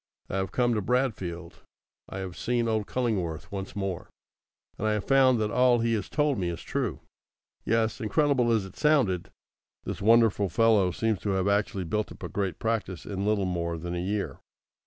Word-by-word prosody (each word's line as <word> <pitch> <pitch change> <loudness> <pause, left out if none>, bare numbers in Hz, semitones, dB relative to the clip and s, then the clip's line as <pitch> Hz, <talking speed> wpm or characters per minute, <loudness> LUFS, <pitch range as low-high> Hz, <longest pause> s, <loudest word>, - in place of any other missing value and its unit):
I 95 - -1
have 95 -1 -2
come 120 -1 +2
to 105 - 0
Bradfield. 95 -8 -2 0.5
I - - -6
have 95 -2 -5
seen 120 -1 0
old 110 -2 0
Cullingworth 100 -11 -2
once 95 -1 -5
more, 95 -4 -3 0.7
and 110 - 0
I 110 - +2
have 105 -2 -1
found 130 -3 +4
that 105 -1 0
all 125 0 +4
he 115 0 +1
has 105 -4 -2
told 150 -5 +1
me 90 -2 -1
is 85 - -6
true. - - -2 0.6
Yes; 115 -1 +1
incredible 125 +1 +2
as 110 -4 +2
it 95 - -12
sounded, 130 - +2 0.5
this - - -5
wonderful 110 -2 +4
fellow 110 -4 +4
seems 110 +3 -1
to 105 - -3
have 95 0 0
actually 100 -1 +1
built 105 +5 -2
up - - -11
a - - -4
great 95 -5 -2
practice 110 -6 -2
in 100 0 -3
little 105 -2 +2
more 85 -2 -2
than 85 +2 -5
a 90 - -2
year. 100 +3 -2
105 Hz, 190 wpm, -27 LUFS, 95-115 Hz, 0.7 s, found